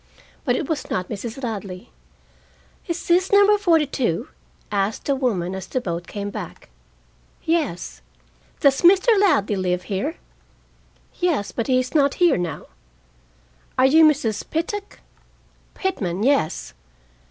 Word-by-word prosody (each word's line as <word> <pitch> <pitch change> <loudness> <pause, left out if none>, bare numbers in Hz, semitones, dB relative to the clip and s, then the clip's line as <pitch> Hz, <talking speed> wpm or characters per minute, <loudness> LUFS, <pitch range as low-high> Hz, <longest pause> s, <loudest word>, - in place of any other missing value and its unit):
But 245 -3 +2
it 280 - -2
was 315 -3 -3
not 180 0 -2
Mrs. 225 +5 -6
Ladley. 200 -3 -6 1.0
"Is 340 -1 -4
this 360 +2 +3
number 405 +1 +6
forty 335 -6 +3
two?" 245 - -2 0.4
asked 200 +1 -1
the 280 - +2
woman, 200 -10 -1
as 190 -1 -6
the 255 - -1
boat 175 -6 -4
came 205 -1 -5
back. - - -8 0.7
"Yes." 320 - -2 0.6
"Does 275 -2 +4
Mr. 375 +5 +5
Ladley 215 - +3
live 180 -1 -1
here?" 195 0 -3 1.0
"Yes. 320 - 0
But 230 - -3
he 255 -1 +3
is 255 0 -4
not 280 -3 +3
here 350 -2 +4
now." 175 -4 -4 1.1
"Are 255 - +5
you 315 +5 +6
Mrs. 265 -9 +2
Pittock?" 395 +6 -4 0.7
"Pitman, 205 - -2
yes." 265 - +1
255 Hz, 130 wpm, -22 LUFS, 195-325 Hz, 1.1 s, number